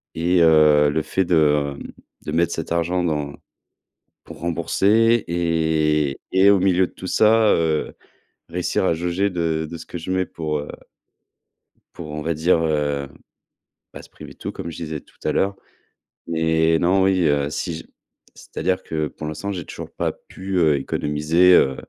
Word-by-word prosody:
et 85 +2 +2
heu, 75 -2 +5
le 80 - 0
fait 95 - -1
de, 75 -4 +2
hem, - - -9 0.3
de - - -4
mettre 85 0 +1
cet 80 - -5
argent 85 +2 0
dans 75 -4 -2 0.9
pour - - -11
rembourser 100 +7 +2
et 80 -4 0
et 95 +2 +5
au 100 - +6
milieu 95 -1 +2
de - - -20
tout 95 - -10
ça, 110 +3 +4
heu, 80 -2 0 0.6
réussir 90 +2 -1
à 85 - +2
jauger 90 +4 -1
de 80 -2 -1
de 85 - -6
ce 80 - -11
que - - -6
je 85 +2 -6
mets 95 0 0
pour, 75 -2 -3
heu 75 - -7 1.3
pour 80 -3 -9
on 75 0 -5
va 80 +2 -1
dire, 80 +2 +2
heu, 75 -3 -1 0.9
pas - - -10
se - - -17
priver - - -12
de - - -26
tout - - -5
comme 85 - -6
je 80 - -9
disais 80 -2 -5
tout - - -26
à - - +1
l'heure 95 0 0 0.8
et 80 0 +2
non, 95 +2 +2
oui, 95 -1 +2
heu, 70 -1 +1
si 85 +2 -4
je - - -9 0.5
c'est-à-dire 90 +3 -3
que, 80 -1 -2
pour 75 +2 -8
l'instant, 90 +6 -4
j'ai 90 -5 -5
toujours - - -9
pas - - -2
pu, 95 +1 -9
heu, 80 -4 +3
économiser, 75 +6 +2
heu, 65 -6 +4
80 Hz, 180 wpm, -21 LUFS, 75-90 Hz, 1.3 s, au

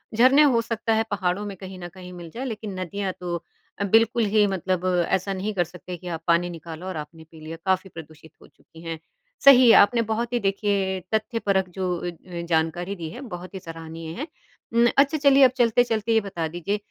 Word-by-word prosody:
झरने 260 +5 +6
हो 250 -5 +4
सकता 225 -1 -1
है 220 0 +2
पहाड़ों 195 +1 -1
में 200 - -6
कहीं 190 -1 -9
न 175 - -6
कहीं 180 -1 -11
मिल 170 -2 -9
जाएँ 260 +3 -5
लेकिन 210 -5 -5
नदियाँ 190 +1 -3
तो 175 -1 -3 0.4
अ, - - 0
बिल्कुल 225 +3 +3
ही 210 -1 +5
मतलब 185 -1 -2 0.2
ऐसा 190 +1 0
नहीं 200 +3 -3
कर 175 -3 +2
सकते 180 +1 -9
कि 180 - -11
आप 165 -2 -4
पानी 170 +1 +3
निकालो 165 +1 -8
और 185 - -4
आपने 160 +2 -8
पी 160 - -14
लिया 160 +1 -7
काफ़ी 190 0 +1
प्रदूषित 160 -1 -12
हो - - -16
चुकी 165 - -18
हैं। 165 -1 -5 0.5
सही 255 -4 +9
आपने 230 +3 +1
बहुत 230 +2 -2
ही 240 - +2
देखिए 195 -2 0
तथ्यपरक 210 -4 0
जो 180 0 -2
अ 175 +1 -4
अ, 170 +1 -9
जानकारी 170 +4 0
दी 165 -3 -6
है 245 - -9
बहुत 180 +2 -10
ही 190 - -5
सराहनीय 165 -1 -8
है। 300 - -4 0.5
उम् 235 +1 +5
अच्छा 285 +3 +4
चलिए 280 -1 +5
अब 255 - +7
चलते-चलते 230 -2 +2
ये 225 - +5
बता 180 -5 -4
दीजिए 175 +5 -3
190 Hz, 210 wpm, -24 LUFS, 175-225 Hz, 0.5 s, सही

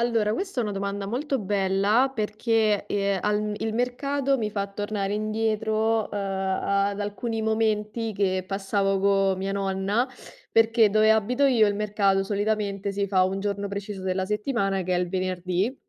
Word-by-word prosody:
Allora, 230 -3 +1
questo 380 - -2
è - - +1
una 210 - -2
domanda 200 0 -3
molto 265 +3 -2
bella 200 +6 +2
perché, 215 -1 +1
ehm, 200 -1 0
al 210 +1 0
il 220 0 -2
mercato 275 +3 0
mi 215 - -1
fa 200 -1 -3
tornare 205 0 -3
indietro, 220 +1 0
ehm, 205 - -2
ad 195 +1 -1
alcuni 220 +2 -3
momenti 220 0 0
che 190 -2 0
passavo 195 0 0
co 195 -1 +3
mia 190 +1 -3
nonna, 195 +4 0 0.5
perché 225 -1 +5
dove 215 +1 +4
abito 245 +6 +3
io 235 -5 +4
il 205 - +1
mercato 200 -2 +1
solitamente 205 -1 -1
si 200 0 -1
fa 185 -2 +3
un 190 +1 -2
giorno 200 0 -2
preciso 200 -1 -5
della 185 0 -1
settimana 210 -2 -1
che 180 0 -1
è - - +2
il 180 -1 -1
venerdì. 185 +4 -1
205 Hz, 160 wpm, -25 LUFS, 195-220 Hz, 0.5 s, perché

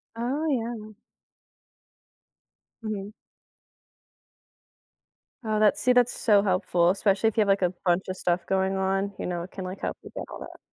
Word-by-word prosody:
Oh, 260 +7 -1
yeah. 230 -4 -3 1.9
Mhm. 210 -2 -4 2.3
Oh, 215 -1 0
that's 215 -1 +4
see, 250 - +3
that's 245 -1 +4
so 205 -3 +4
helpful, 180 -3 +2
especially 195 +2 +2
if 225 - -1
you - - +5
have 210 - +2
like 195 0 +3
a 180 -1 +2 0.2
buncha 185 +2 +1
stuff 175 -1 0
going 190 0 +1
on, 195 +1 0
you - - -3
know, 175 -1 -3
it 180 - -10
can, 190 - -6
like, 185 +1 -6
help - - -2
you - - -10
get - - -4
all - - -7
that. - - -10
200 Hz, 160 wpm, -26 LUFS, 190-220 Hz, 2.3 s, you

